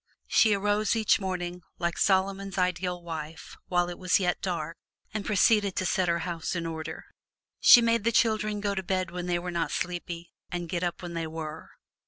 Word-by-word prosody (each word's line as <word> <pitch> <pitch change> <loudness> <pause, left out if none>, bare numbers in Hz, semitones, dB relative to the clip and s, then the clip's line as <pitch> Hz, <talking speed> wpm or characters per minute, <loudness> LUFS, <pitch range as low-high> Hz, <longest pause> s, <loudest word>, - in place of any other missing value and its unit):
She 215 -3 +4
arose 205 +2 +1
each 220 -1 +3
morning, 180 -2 -3 0.2
like 170 -1 -1
Solomon's 195 0 +1
ideal 180 -1 -1
wife, 160 -1 -7
while 175 -1 +2
it 175 - -7
was 185 0 +3
yet 180 -2 0
dark, 165 -4 -3 0.4
and 215 -1 -2
proceeded 205 -1 +3
to 185 - -1
set 185 0 +1
her 170 0 0
house 170 0 -3
in 170 -1 -2
order. 160 -1 -5 0.5
She 240 - +9
made 230 -2 +2
the 230 - +2
children 215 -2 +1
go 200 -1 0
to 190 - -2
bed 185 -1 -1
when 180 0 -4
they 175 -1 +1
were 180 +1 -4
not 170 -1 -1
sleepy 175 -1 -4 0.2
and 175 -1 -3
get 175 0 -2
up 175 0 -3
when 175 -1 -6
they 165 -1 -2
were. 160 0 -7
180 Hz, 195 wpm, -28 LUFS, 170-195 Hz, 0.5 s, She